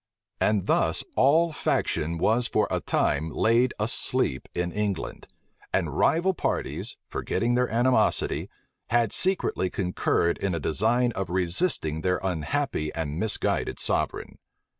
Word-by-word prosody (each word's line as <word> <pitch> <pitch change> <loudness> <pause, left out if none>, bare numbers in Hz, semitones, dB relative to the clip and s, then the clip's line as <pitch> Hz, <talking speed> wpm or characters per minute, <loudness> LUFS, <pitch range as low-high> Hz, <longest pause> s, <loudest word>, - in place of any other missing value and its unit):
And 105 -3 +1
thus - - +1
all 160 +5 +4
faction 85 - -1
was 115 +8 +2
for 105 - +1
a - - 0
time 75 +3 0
laid 115 +9 +2
asleep 65 -1 +1
in 90 0 -1
England; 105 -1 -3 0.4
and - - -1
rival 175 +4 +2
parties, - - -3
forgetting 120 +1 -1
their 125 0 +1
animosity, 120 +3 +1 0.4
had 115 -2 +1
secretly 180 - +2
concurred 90 -2 0
in 95 -3 -1
a - - -2
design 115 - +1
of 95 -5 -4
resisting 85 - +1
their 90 0 0
unhappy 90 - -2
and 80 -1 -3
misguided 110 +1 0
sovereign. - - -1
105 Hz, 125 wpm, -26 LUFS, 85-125 Hz, 0.4 s, all